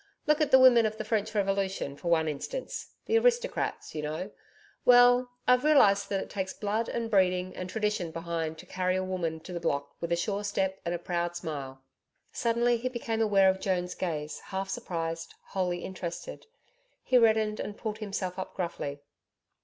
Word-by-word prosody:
Look 300 0 +3
at 305 - +3
the 265 - +8
women 245 -3 +7
of 215 0 -5
the - - -3
French 215 -2 -1
Revolution 195 -7 0
for 160 - -8
one 160 -2 +3
instance 155 - -5
the 455 +1 +3
aristocrats, 485 +1 0
you 155 - -3
know 155 +6 -4 0.5
well, 245 0 +6 0.2
I've 250 +1 +5
realised 200 -10 +5
that 195 - 0
it - - -6
takes 190 -2 -3
blood 215 +2 -1
and 235 -1 -2
breeding 185 -2 +2
and 185 0 -5
tradition 210 -4 -1
behind 165 -1 -3
to - - -11
carry 185 0 -1
a 185 - 0
woman 170 -4 -3
to 180 - -9
the 175 - -3
block 140 -4 -2
with 170 0 -3
a - - +4
sure 200 +4 -2
step 195 -2 -1
and 170 +1 -1
a - - -1
proud 175 0 -2
smile 135 -5 -6 0.3
...' - - -49
Suddenly, 235 +1 +2
he 250 +2 -2
became 230 -2 -2
aware 200 -3 +5
of 190 - -6
Joan's 180 -2 -1
gaze, 155 -4 -3
half 190 0 -4
surprised, 165 -3 -4
wholly 180 -2 -1
interested.... 185 - -6 0.6
He 255 - +4
reddened 220 -2 +3
and 205 - -5
pulled 215 -1 -4
himself 195 -3 -4
up 185 - -6
gruffly. 145 -5 -4
190 Hz, 185 wpm, -29 LUFS, 170-220 Hz, 0.6 s, the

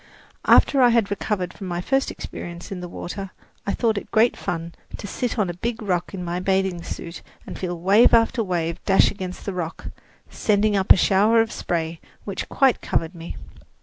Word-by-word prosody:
After 275 - +5
I 245 - +7
had 230 -4 +2
recovered 195 -3 -2
from 195 - -8
my 175 -1 -2
first 270 +9 0
experience 175 +2 -8
in 190 - -4
the 180 0 -7
water, 195 +3 -6 0.4
I 200 - 0
thought 220 -4 +1
it - - -15
great 225 +3 +3
fun 170 -1 -4 0.2
to - - -8
sit 245 +5 -3
on 210 -4 +2
a 175 - -3
big 230 +6 -3
rock 180 -5 -1
in 185 -2 -5
my 175 +1 -2
bathing 190 -1 0
suit 170 0 -7 0.2
and - - -8
feel 175 -2 -3
wave 200 +7 +5
after 230 +1 +3
wave 170 -3 -2
dash 195 - +4
against 185 -2 -7
the 200 - -3
rock, 175 -2 -5 0.4
sending 210 0 +1
up 195 -1 +2
a - - +9
shower 210 +5 +4
of 225 0 +2
spray 165 -1 -3 0.2
which 200 -2 -5
quite 270 -3 +3
covered 165 +2 -1
me. 170 -1 -8
190 Hz, 195 wpm, -23 LUFS, 175-215 Hz, 0.4 s, a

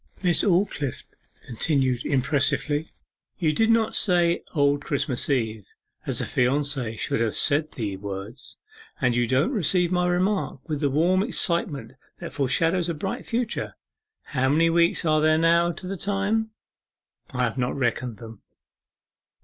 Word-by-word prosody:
Miss 175 -2 +3
Aldclyffe 175 - 0 0.4
continued 130 0 0
impressively, 145 +3 0 0.5
'You 155 -3 +1
did 225 +8 +2
not 225 -1 +2
say 175 -3 +2
"Old 145 -1 +2
Christmas 140 -3 -1
Eve" 110 -6 -1 0.4
as - - -1
a - - -1
fiancee 130 -2 0
should - - -1
have 115 -2 0
said 150 +1 +1
the 105 -5 -4
words: 100 +6 -8 0.4
and 125 -5 +1
you 120 -1 +1
don't 130 - +1
receive 180 - +1
my 180 -1 +1
remark 180 -5 -1
with 150 -3 -2
the 145 - +2
warm 170 +7 +2
excitement 170 - +1 0.2
that - - -8
foreshadows 165 +6 +1
a 170 - -2
bright 190 +6 -5
future.... 235 0 -2 0.5
How 130 -2 -1
many 165 +3 +3
weeks 170 +1 +2
are 155 -1 +3
there 155 0 +4 0.3
to 180 +2 -6
the 195 +1 -4
time?' 205 +3 -1 0.8
'I 125 0 -2
have 120 0 -1
not 125 +2 -1
reckoned 120 -2 -1
them. 115 -2 -11
150 Hz, 145 wpm, -24 LUFS, 125-175 Hz, 0.8 s, there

